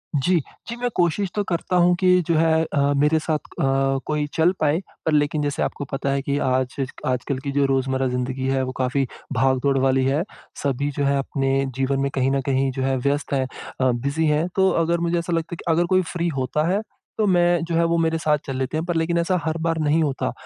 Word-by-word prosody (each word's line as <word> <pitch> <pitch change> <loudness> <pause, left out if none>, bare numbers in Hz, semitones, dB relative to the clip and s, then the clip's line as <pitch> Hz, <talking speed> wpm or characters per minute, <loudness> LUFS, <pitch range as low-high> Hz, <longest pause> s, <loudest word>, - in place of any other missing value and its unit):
जी। 175 +6 +2 0.3
जी, 235 - -4
मैं 245 0 -2
कोशिश 175 +2 +1
तो 205 - +1
करता 180 0 -2
हूँ 175 0 +4
कि 180 -1 +4
जो 165 - +2
है 160 0 +3
अ, 155 -2 -2 0.2
मेरे 150 +2 +3
साथ 155 0 0
अ, 135 -1 0
कोई 150 -1 -1
चल 165 +3 +3
पाए 155 +2 +2 0.3
पर 160 - +2
लेकिन 150 0 +1
जैसे 145 -1 -1
आपको 145 - -3
पता 135 0 -2
है 140 0 0
कि 140 +1 -1
आज 130 0 0 0.3
आजकल 130 +1 -1
की 140 - -2
जो 140 0 +2
रोज़मर्रा 135 0 0
ज़िंदगी 125 +1 -2
है 135 0 +1
वो 130 - -3
काफ़ी 130 +1 0 0.3
भाग-दौड़ 130 +2 +2
वाली 130 0 +2
है। 145 +5 +1 0.4
सभी 140 +1 0
जो 145 - +1
है 140 0 +2
अपने 135 0 0
जीवन 135 +1 0
में 140 - 0
कहीं 135 0 +1
न 135 0 +1
कहीं 135 0 0
जो 130 0 -3
है 135 0 +1
व्यस्त 140 +2 -1
है 135 -1 +2 0.4
अ, 130 -1 +4
बिज़ी 140 +7 -1
है। 150 +3 +2
तो 190 0 +4
अगर 170 +1 +1
मुझे 170 0 0
ऐसा 170 0 -3
लगता 165 +1 -2
है - - -5
कि 165 - +2
अगर 175 +2 +2
कोई 185 - +5
फ्री 175 -1 -1
होता 150 +5 0
है 205 - +1 0.4
तो 215 - +2
मैं 175 -2 +3
जो 170 - -2
है 170 - +3
वो 170 - +2
मेरे 165 0 +1
साथ 150 -2 +2
चल 135 - -4
लेते 130 +4 -2
हैं 160 - -2
पर 175 - -2
लेकिन 165 +1 +1
ऐसा 175 +2 +1
हर 160 0 -1
बार 165 -1 0
नहीं 155 +2 +2
होता। 135 - -1
145 Hz, 240 wpm, -22 LUFS, 135-170 Hz, 0.4 s, कोई